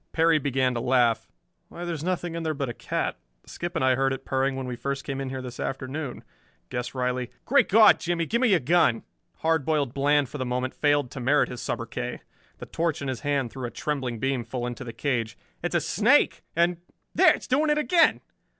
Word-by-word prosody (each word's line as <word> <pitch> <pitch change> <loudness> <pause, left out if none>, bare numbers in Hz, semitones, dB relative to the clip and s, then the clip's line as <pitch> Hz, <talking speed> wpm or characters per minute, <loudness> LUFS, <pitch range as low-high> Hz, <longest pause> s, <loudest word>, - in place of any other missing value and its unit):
Perry 165 -1 +4
began 130 -2 +1
to 120 - -2
laugh. 120 -2 +2 0.4
"Why, 175 - -7
there's 165 -3 -4
nothing 175 -1 -2
in 170 - -3
there 160 -1 -2
but 140 -3 -2
a - - -4
cat. - - -3 0.3
Skip 175 +1 -6
and 150 - +1
I 130 - +4
heard 135 +1 +1
it 135 0 -5
purring 135 0 0
when 135 0 -4
we 125 -1 -4
first 140 +3 -3
came 135 -1 -4
in 135 - -3
here 130 0 -5
this 125 -1 -8
afternoon. 135 +1 -4 0.5
Guess 125 +1 -4
Riley 125 -1 -1
" - - -42
"Great 280 +1 +3
God, 220 +2 +7
Jimmie, 170 -1 -1
give 235 +8 0
me 255 - +4
your 195 -5 +4
gun!" 155 -5 +3 0.4
Hard 160 -2 +2
Boiled 145 -4 0
Bland 145 0 +2
for 145 - -8
the - - 0
moment 125 +1 -2
failed 145 -4 +1
to - - -7
merit 140 +4 +2
his 125 -1 -6
sobriquet. 120 +1 -4 0.4
The - - -8
torch 165 -3 -2
in 135 - -3
his 130 -3 -3
hand 140 -5 -1
threw 130 +2 -6
a - - -3
trembling 130 -3 -3
beam 130 +1 -1
full 120 +1 -4
into 120 +1 -5
the 120 - -6
cage. 115 -2 -2 0.2
"It's - - -2
a - - +4
snake! - - +3
And 170 +1 +2 0.4
there! - - +6
It's - - -10
doing 295 +4 +2
it 300 - +3
again!" 330 +2 +3
135 Hz, 225 wpm, -26 LUFS, 125-160 Hz, 0.5 s, God